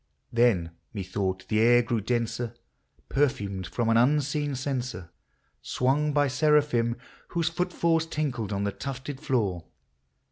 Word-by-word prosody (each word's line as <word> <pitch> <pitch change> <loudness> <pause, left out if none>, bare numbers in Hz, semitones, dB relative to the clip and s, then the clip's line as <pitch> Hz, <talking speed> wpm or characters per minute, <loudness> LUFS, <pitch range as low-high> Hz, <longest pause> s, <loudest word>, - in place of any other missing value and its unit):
Then 115 -9 +3 0.2
methought 95 -1 -2
the 110 - +1
air 120 +2 +6
grew 115 -1 -1
denser, 120 +1 -2 0.5
perfumed 105 -10 0
from 120 -2 -1
an 115 0 +4
unseen 145 +2 +2
censer, 125 - -4 0.5
Swung 145 +4 +1
by 145 0 +3
seraphim, 135 -4 +2 0.3
whose 170 -1 0
footfalls 170 -2 +1
tinkled 125 -10 -2
on 100 0 -1
the 100 - 0
tufted 135 +3 -6
floor. 105 - 0
125 Hz, 120 wpm, -27 LUFS, 110-145 Hz, 0.5 s, air